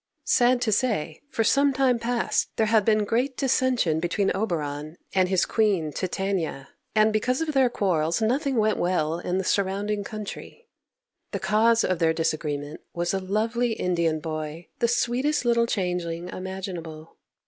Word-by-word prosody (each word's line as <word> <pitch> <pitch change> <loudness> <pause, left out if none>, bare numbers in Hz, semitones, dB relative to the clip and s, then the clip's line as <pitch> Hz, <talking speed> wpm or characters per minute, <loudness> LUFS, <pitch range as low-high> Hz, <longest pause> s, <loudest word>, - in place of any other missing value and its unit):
Sad 245 0 +3
to 220 - +1
say, 200 -9 0
for 245 -5 0
some 275 +4 +3
time 255 -2 +2
past 235 0 0
there 220 - +2
had 215 -1 +3
been 215 0 +2
great 250 +5 0
dissension 255 - +1
between 175 +4 0
Oberon 155 -6 -3 0.2
and 185 -1 +3
his 190 -2 +2
Queen, 195 -9 +1
Titania, 185 -7 -2 0.3
and 215 0 +4
because 250 +4 +1
of 320 -2 -2
their 265 -2 +4
quarrels 170 -7 0
nothing 265 +5 0
went 215 -1 +2
well 170 -2 0
in 180 +1 -2
the 190 - 0
surrounding 200 +2 0
country. 215 - -8 0.7
The - - -1
cause 225 +2 +3
of 185 -2 0
their 165 -1 +3
disagreement 155 -2 -2
was 175 +1 -1
a 195 - 0
lovely 225 +5 0
Indian 170 -6 0
boy, 155 +1 -5
the 235 - +3
sweetest 245 +4 0
little 235 -1 +3
changeling 180 -4 -2
imaginable. 180 -4 -7
200 Hz, 155 wpm, -25 LUFS, 170-235 Hz, 0.7 s, and